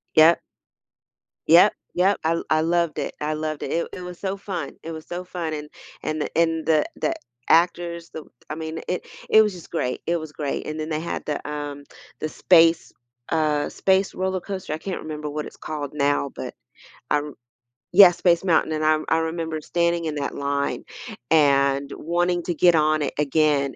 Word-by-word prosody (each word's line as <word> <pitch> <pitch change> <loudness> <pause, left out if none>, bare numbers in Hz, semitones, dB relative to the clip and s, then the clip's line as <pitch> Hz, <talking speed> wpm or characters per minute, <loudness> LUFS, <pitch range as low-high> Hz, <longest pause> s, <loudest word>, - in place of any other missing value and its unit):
Yep. 160 +2 +7 1.1
Yep, 175 +6 +7 0.2
yep. 190 +3 +3
I 160 - +3
l 165 - -2
I 155 - +3
loved 170 -1 +1
it, - - -4
I 155 +1 -1
loved 155 -1 -3
it, - - -4
it 170 - 0
it - - -7
was 180 -1 -8
so 195 0 -2
fun, 190 -8 -5
it 165 - -6
was 160 -1 -8
so 180 +1 -5
fun, 175 -3 -4
and 150 -1 -6 0.3
and 155 0 -2
th - - -3
and 165 -1 +1
the 155 -2 +3
the - - 0 0.4
actors, 170 0 +2
the - - -5
w - - -24 0.2
I - - -3
mean, 160 0 -5
it 180 - -2 0.2
it 220 - +7
was 210 -2 +1
just 175 -2 -12
great, 125 -6 -2
it 170 +1 +1
was 155 -2 -8
great, 145 -3 -3
and 155 - -4
then 155 +1 -4
they 155 -1 -1
had 170 - -4
the, 150 -1 -3
um, 145 -1 -5 0.4
the - - -2
space, 165 0 +4 0.4
uh 155 -2 +1
space 190 0 +1
roller 185 0 -2
coaster, 190 -4 -5
I - - -2
can't 185 +3 -5
remember 150 -1 -5
what 150 +1 -4
it's - - -11
called 150 -3 -5
now, 145 -1 +1
but - - -6 0.6
I - - +5
r 150 -1 -8 0.6
Yeah, 190 -1 +10
Space 170 0 +2
Mountain, 160 -3 +2
and 155 0 -2
I 155 0 +4 0.2
I - - +2
remember 160 -2 -4
standing 170 0 0
in 155 -1 -2
that 140 -1 -3
line 140 0 -1 0.5
and 140 -2 +3
wanting 175 +2 0
to - - +2
get 175 +2 +5
on 155 0 +3
it 140 - -2
again 145 -1 +2
160 Hz, 200 wpm, -23 LUFS, 150-175 Hz, 1.1 s, Yeah